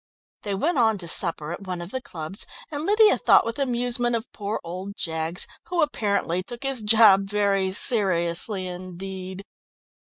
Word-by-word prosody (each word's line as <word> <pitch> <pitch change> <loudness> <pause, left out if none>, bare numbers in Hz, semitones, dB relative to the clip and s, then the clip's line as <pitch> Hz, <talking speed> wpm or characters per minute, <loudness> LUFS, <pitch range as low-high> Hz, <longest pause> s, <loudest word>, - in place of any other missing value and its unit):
They 205 -2 -3
went 295 - 0
on 220 -3 +3
to 175 -3 -6
supper 165 -2 +2
at 185 +3 -8
one 180 -1 -4
of 175 +2 -8
the 260 - -4
clubs, 165 -3 -6 0.2
and 295 +2 -4
Lydia 425 +1 +4
thought - - +4
with 230 +3 -4
amusement 245 -2 0
of 230 0 -3
poor 205 +1 -4
old 185 +4 -7
Jaggs, 160 +2 -3 0.2
who 345 -2 +1
apparently 200 - -1
took 235 +7 -9
his 270 -3 +1
job 210 -2 +5
very 200 -2 +1
seriously 185 -2 +3
indeed. 185 +1 -8
200 Hz, 160 wpm, -24 LUFS, 180-235 Hz, 0.2 s, job